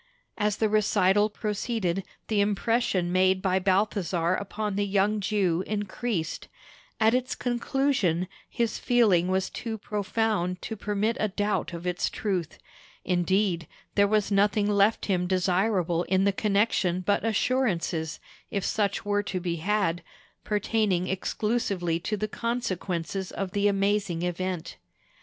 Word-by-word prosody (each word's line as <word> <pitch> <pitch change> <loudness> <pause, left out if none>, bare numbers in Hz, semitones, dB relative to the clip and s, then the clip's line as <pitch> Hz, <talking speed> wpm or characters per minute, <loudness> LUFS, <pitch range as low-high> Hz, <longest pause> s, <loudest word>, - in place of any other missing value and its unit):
As 210 0 0
the 220 - +2
recital 205 -1 +3
proceeded, 210 -3 -2 0.2
the 210 -2 +2
impression 205 -3 +1
made 185 +1 +3
by 190 -1 +1
Balthasar 185 -3 +1
upon 205 +1 -3
the 205 - +1
young 200 +2 +2
Jew 190 -4 +1
increased; 205 -4 -3 0.5
at 220 +1 +4
its 255 +2 0
conclusion, 240 - 0 0.2
his 235 -2 -1
feeling 210 -8 +3
was 190 0 0
too 225 -2 -4
profound 210 -3 -1
to 220 - -4
permit 210 +2 -1
a 215 - +2
doubt 205 -2 -1
of 170 0 -7
its 180 0 0
truth; 185 -6 -3 0.5
indeed, 180 -1 +1 0.3
there 200 0 +4
was 210 0 +1
nothing 205 +1 +3
left 205 +1 +3
him 180 -3 0
desirable 185 -1 +1
in 190 +1 +2
the 200 - +4
connection 200 -3 +1
but 200 +3 +1
assurances, 205 - 0 0.3
if 200 -3 -2
such 205 -2 0
were 205 0 +1
to 195 -2 -3
be 175 -1 -2
had, 185 -1 0 0.4
pertaining 210 -4 0
exclusively 190 -3 -1
to 210 +5 -2
the 215 - -1
consequences 195 -6 -3
of 195 -2 -4
the 205 +1 +2
amazing 195 -3 +1
event. 180 -1 -3
200 Hz, 135 wpm, -27 LUFS, 180-215 Hz, 0.5 s, at